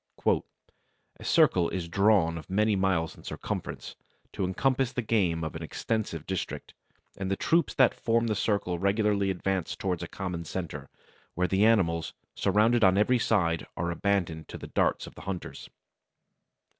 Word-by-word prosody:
"A - - -10
circle 85 -2 +4
is 90 -3 -3
drawn 95 -2 +3
of 80 - -8
many 105 +2 +2
miles 95 -4 0
in - - -16
circumference, - - -5 0.4
to - - -2
encompass 130 +7 +1
the 125 - -3
game 90 -7 +1
of 80 - -4
an 80 - -5
extensive 85 -1 -3
district; 95 -2 -4 0.4
and 95 -1 -3
the 95 - +1
troops 165 - +1
that 130 -2 +5
form 115 0 +1
the 110 - 0
circle 100 -4 0
regularly 100 0 +1
advance 95 -1 -1
towards 90 -3 -2
a 90 - -4
common 90 -3 -5
centre, 80 -4 -6 0.5
where 90 +1 +1
the 95 +3 +3
animals, 85 -7 +1 0.2
surrounded 115 +2 +3
on 95 0 +5
every 120 +4 +3
side, 85 -8 +1
are 85 0 -1
abandoned 85 -3 -1
to - - -8
the - - -9
darts - - 0
of - - -11
the - - -12
hunters." 95 -2 -6
95 Hz, 160 wpm, -28 LUFS, 85-105 Hz, 0.5 s, that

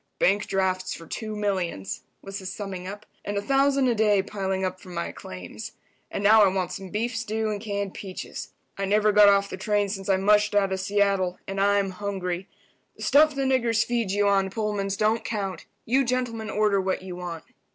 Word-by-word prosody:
"Bank 200 +2 +2
drafts 185 -1 0
for 165 - -11
two 215 +5 -5
millions," 185 - -2 0.2
was 195 0 -6
his 185 -1 -5
summing 190 -3 -6
up, 205 +2 -8 0.2
"and 205 0 -3
a - - 0
thousand 275 0 +3
a 245 - +3
day 210 -3 +3
piling 190 -2 -2
up 185 0 -3
from 180 -1 -11
my 170 - -2
claims. 90 -1 -8 0.4
And 200 - -4
now 215 +1 +7
I - - +6
want 185 -2 -1
some 195 -3 -6
beef 225 +5 -2
stew 220 -1 -1
and 205 -1 -4
canned 200 -3 -3
peaches. 190 -2 -7 0.3
I 195 - 0
never 210 +2 +3
got 210 0 +7
off 200 0 +4
the 185 - -6
train 205 0 +1
since 195 0 -4
I 190 - +4
mushed 210 +2 +3
out 195 -2 +3
of 190 - -2
Seattle, 195 -2 +1
and 195 0 -2
I'm 200 -1 +3
hungry. 185 -1 -4 0.5
The - - -8
stuff 300 +1 +5
the 275 - 0
niggers 240 -4 +2
feed 235 -4 -1
you 205 +1 +2
on 195 -1 +3
Pullmans 200 -2 -2
don't 220 +1 +2
count. 195 -6 -4 0.2
You 265 +4 +3
gentlemen 240 -3 -2
order 210 -2 +2
what 185 0 -1
you 185 -1 -6
want." 175 -2 -6
200 Hz, 205 wpm, -26 LUFS, 190-215 Hz, 0.5 s, now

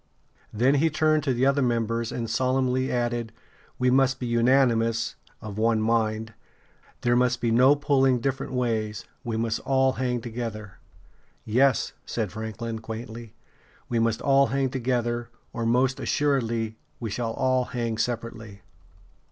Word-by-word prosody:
Then 125 +6 +3
he 165 - +4
turned 155 0 +2
to 135 - +2
the 125 +2 +2
other 140 +1 +3
members, 115 -2 0
and 115 -1 -3
solemnly 130 +1 +1
added: 120 -2 -1 0.5
"We 125 0 +2
must 135 0 +3
be 125 - -3
unanimous 115 -1 +2 0.3
[of 105 -1 -6
one 115 0 +2
mind]; 110 0 0 0.7
there 120 0 +2
must 125 0 +2
be 115 -2 0
no 130 +5 +6
pulling 135 -3 +2
different 135 +2 -2
ways; 110 -4 -1 0.2
we 115 -2 -3
must 115 0 -1
all 135 -1 +2
hang 125 -2 -1
together." 115 -3 -6 0.7
"Yes," 130 +4 +2
said 110 -5 -3
Franklin, 110 +1 -5
quaintly: 110 0 -8 0.5
"we 120 - +1
must 115 -1 +1
all 140 0 +4
hang 135 +2 0
together, 120 -2 -1 0.2
or 115 -1 -2
most 130 +3 +2
assuredly 115 -7 0 0.2
we 115 -3 -4
shall 115 +1 -2
all 130 -1 +1
hang 115 -3 -3
separately." 115 -4 -4
120 Hz, 145 wpm, -26 LUFS, 115-130 Hz, 0.7 s, no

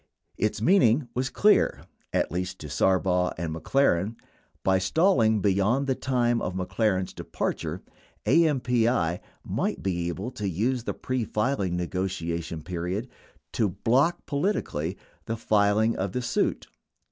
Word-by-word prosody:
13 - - +2
Its 105 - -6
meaning 135 - +4
was 130 +2 -1
clear, 210 +7 +3 0.3
at - - 0
least 90 +2 -3
to 75 - -8
Sarbaugh 90 +3 +1
and 80 -1 -3
McLaren 100 - +1 0.2
— - - -39
by 95 0 +3
stalling 110 - +3
beyond 105 +7 +2
the 135 - +1
time 120 -2 0
of 90 - -3
McLaren's 95 0 0
departure, - - -4 0.4
AMPI 125 - +2 0.2
might - - -2
be 85 -3 -1
able 95 +8 -4
to 105 -6 -3
use 115 +7 -1
the - - -3
pre 130 -2 -2
filing 105 -5 -1
ne 90 - -1
gotiation 85 -3 -3
period 90 +7 -3 0.4
to 110 -3 +1
"block 135 - +1
politically" 140 - -1 0.3
the 115 - -3
filing 110 +1 +2
of 95 0 -3
the 125 - -2
suit. - - 0
105 Hz, 140 wpm, -26 LUFS, 90-125 Hz, 0.4 s, meaning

